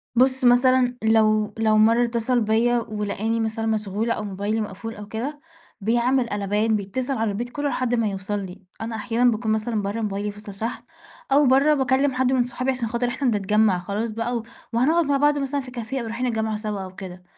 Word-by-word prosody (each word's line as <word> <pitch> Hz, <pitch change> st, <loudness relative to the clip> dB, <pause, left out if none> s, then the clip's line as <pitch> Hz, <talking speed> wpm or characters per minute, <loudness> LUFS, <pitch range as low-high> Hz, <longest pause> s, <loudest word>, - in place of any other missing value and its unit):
بُص، 260 Hz, +1 st, +3 dB
مثلا 250 Hz, 0 st, +4 dB
لو 215 Hz, -1 st, +3 dB
لو 220 Hz, -1 st, +3 dB
مرّة 230 Hz, +3 st, +5 dB
اتّصل 235 Hz, +1 st, 0 dB
بيّا 230 Hz, +3 st, +2 dB
ولقاني 215 Hz, +1 st, -2 dB
مثلا 225 Hz, 0 st, -2 dB
مشغولة 215 Hz, +1 st, -1 dB
أو 215 Hz, -, -4 dB
موبايلي 205 Hz, +2 st, -2 dB
مقفول 215 Hz, +2 st, -6 dB
أو 210 Hz, 0 st, -9 dB
كده، 255 Hz, +8 st, -4 dB, 0.4 s
بيعمل 240 Hz, +4 st, +2 dB
قلبان، 205 Hz, +2 st, 0 dB
بيتصل 250 Hz, +7 st, -2 dB
على 220 Hz, -2 st, 0 dB
البيت 240 Hz, +4 st, -4 dB
كُلّه 290 Hz, +3 st, -2 dB
لحد 250 Hz, -3 st, 0 dB
ما 230 Hz, -2 st, +1 dB
يوصل 195 Hz, +1 st, -3 dB
لي. 190 Hz, 0 st, -8 dB, 0.2 s
أنا 225 Hz, 0 st, -4 dB
أحيانًا 230 Hz, +3 st, +2 dB
باكون 220 Hz, 0 st, -1 dB
مثلًا 220 Hz, 0 st, 0 dB
برّه، 205 Hz, +3 st, -3 dB
موبايلي 205 Hz, -1 st, -2 dB
فصل 205 Hz, -1 st, -10 dB
شحن 225 Hz, +5 st, -4 dB, 0.5 s
أو 285 Hz, +2 st, +5 dB
برّه 275 Hz, +4 st, +5 dB
باكلّم 265 Hz, 0 st, +2 dB
حد 255 Hz, 0 st, +1 dB
من 250 Hz, -2 st, +3 dB
صحابي 255 Hz, +2 st, -2 dB
عشان 245 Hz, -3 st, -2 dB
خاطر 235 Hz, +2 st, -1 dB
إحنا 245 Hz, 0 st, 0 dB
بنتجمّع 210 Hz, -1 st, +2 dB
خلاص 205 Hz, +5 st, -3 dB
بقى 230 Hz, +2 st, -2 dB
و 225 Hz, -, -5 dB, 0.3 s
وهنقعد 310 Hz, +8 st, +3 dB
مع 285 Hz, -1 st, +2 dB
بعض 290 Hz, +1 st, +3 dB
مثلا 280 Hz, 0 st, -1 dB
في 255 Hz, -1 st, -10 dB
كافية 250 Hz, +2 st, -4 dB
أو -, -, -5 dB
رايحين 230 Hz, +3 st, -3 dB
الجامعة 220 Hz, -3 st, -1 dB
سوا 210 Hz, -2 st, -4 dB
أو 185 Hz, 0 st, -10 dB
كده، 180 Hz, -1 st, -9 dB
225 Hz, 200 wpm, -23 LUFS, 210-250 Hz, 0.5 s, مرّة